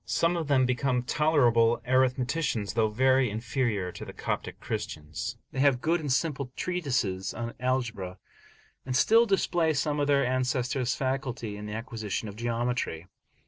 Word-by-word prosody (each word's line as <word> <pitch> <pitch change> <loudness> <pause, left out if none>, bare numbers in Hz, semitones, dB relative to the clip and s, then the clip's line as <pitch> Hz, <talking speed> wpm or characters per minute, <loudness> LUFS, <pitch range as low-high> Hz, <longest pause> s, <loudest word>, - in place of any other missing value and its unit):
Some 170 +1 +1
of 165 -3 -2
them 130 -3 +4
become 125 0 0
tolerable 120 -5 +3
arithmeticians, 130 -3 +1
though 110 -1 +2
very 130 +3 +3
inferior 110 -3 -1
to - - -8
the - - -8
Coptic - - -4
Christians; 75 0 -5
they - - -5
have 135 -2 +4
good 165 +5 +1
and 145 -4 -3
simple 140 -2 0
treatises 130 - -1
on 115 0 -4
algebra, 120 -8 -2 0.7
and 130 -1 -3
still 225 - +5
display 175 -5 +2
some 145 +2 0
of 145 - +1
their 140 -2 +3
ancestors' 125 0 0
facility 130 -5 -2
in 105 0 -7
the 105 - -5
acquisition 110 -2 -4
of 100 - -8
geometry. 115 -7 -2
125 Hz, 150 wpm, -28 LUFS, 115-140 Hz, 0.7 s, still